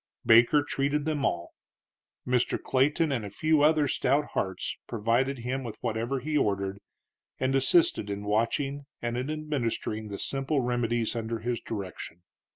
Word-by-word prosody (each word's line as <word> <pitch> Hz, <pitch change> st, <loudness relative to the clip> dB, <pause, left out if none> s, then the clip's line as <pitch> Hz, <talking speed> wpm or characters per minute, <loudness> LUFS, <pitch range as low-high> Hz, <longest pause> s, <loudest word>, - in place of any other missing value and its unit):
Baker 120 Hz, +6 st, +6 dB
treated 145 Hz, +1 st, -1 dB
them 155 Hz, -3 st, -1 dB
all. 85 Hz, -10 st, -1 dB, 0.7 s
Mr. 125 Hz, -1 st, +1 dB
Clayton 145 Hz, +4 st, +1 dB
and 120 Hz, -5 st, -1 dB
a 100 Hz, -, -5 dB
few 155 Hz, +9 st, +2 dB
other 150 Hz, -1 st, +4 dB
stout 140 Hz, +3 st, +1 dB
hearts 95 Hz, -1 st, -2 dB
provided 120 Hz, +5 st, 0 dB
him 125 Hz, +3 st, -3 dB
with 110 Hz, -3 st, -7 dB
whatever 120 Hz, +3 st, -2 dB
he 155 Hz, +3 st, -3 dB
ordered, 100 Hz, -6 st, 0 dB, 0.6 s
and 130 Hz, +1 st, +1 dB
assisted 135 Hz, -, +3 dB
in 100 Hz, 0 st, -4 dB
watching 135 Hz, +7 st, -1 dB, 0.2 s
and 120 Hz, 0 st, -1 dB
in 130 Hz, +3 st, -2 dB
administering 135 Hz, -8 st, -2 dB
the 100 Hz, -1 st, -6 dB
simple 135 Hz, +5 st, -1 dB
remedies 120 Hz, -2 st, 0 dB
under 115 Hz, 0 st, -2 dB
his 120 Hz, +1 st, -2 dB
direction. 90 Hz, -5 st, -7 dB
125 Hz, 150 wpm, -28 LUFS, 110-140 Hz, 0.7 s, Baker